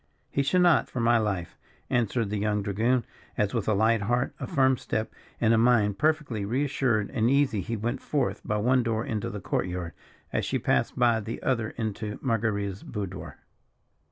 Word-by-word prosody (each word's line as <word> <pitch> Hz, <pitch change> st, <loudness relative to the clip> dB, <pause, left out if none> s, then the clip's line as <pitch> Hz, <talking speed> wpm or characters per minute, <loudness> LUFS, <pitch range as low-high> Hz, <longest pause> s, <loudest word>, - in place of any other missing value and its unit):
"He 140 Hz, -, +1 dB
should 165 Hz, +7 st, +2 dB
not, 175 Hz, -4 st, +4 dB
for 125 Hz, -, -4 dB
my 115 Hz, 0 st, +4 dB
life!" 100 Hz, -6 st, -2 dB, 0.3 s
answered 115 Hz, -2 st, 0 dB
the 105 Hz, -, -1 dB
young 105 Hz, 0 st, 0 dB
dragoon, 115 Hz, +5 st, +1 dB, 0.3 s
as 105 Hz, -1 st, +1 dB
with 115 Hz, -4 st, -1 dB
a 110 Hz, -, +3 dB
light 110 Hz, +2 st, +3 dB
heart, 120 Hz, +5 st, 0 dB
a -, -, -4 dB
firm 130 Hz, -5 st, +3 dB
step, 110 Hz, -2 st, -3 dB, 0.3 s
and 115 Hz, -1 st, +3 dB
a 115 Hz, -, +4 dB
mind 110 Hz, -4 st, +3 dB
perfectly 150 Hz, -9 st, +1 dB
re 120 Hz, +8 st, 0 dB
assured 120 Hz, -7 st, 0 dB
and 115 Hz, +1 st, +1 dB
easy 135 Hz, -7 st, +2 dB
he 115 Hz, +4 st, -3 dB
went 120 Hz, +5 st, -2 dB
forth 140 Hz, -4 st, -1 dB
by 105 Hz, -, -1 dB
one 125 Hz, +4 st, +3 dB
door 115 Hz, -1 st, -1 dB
into 115 Hz, +1 st, -2 dB
the 105 Hz, -3 st, -5 dB
court 90 Hz, -, -1 dB
yard 90 Hz, -2 st, -5 dB, 0.4 s
as -, -, 0 dB
she -, -, 0 dB
passed -, -, 0 dB
by 120 Hz, -2 st, +4 dB
the 110 Hz, +2 st, -5 dB
other 115 Hz, -4 st, 0 dB
into 110 Hz, -2 st, -3 dB
Marguerita's 105 Hz, -5 st, -1 dB
boudoir. 100 Hz, -4 st, -6 dB
115 Hz, 190 wpm, -27 LUFS, 105-125 Hz, 0.4 s, not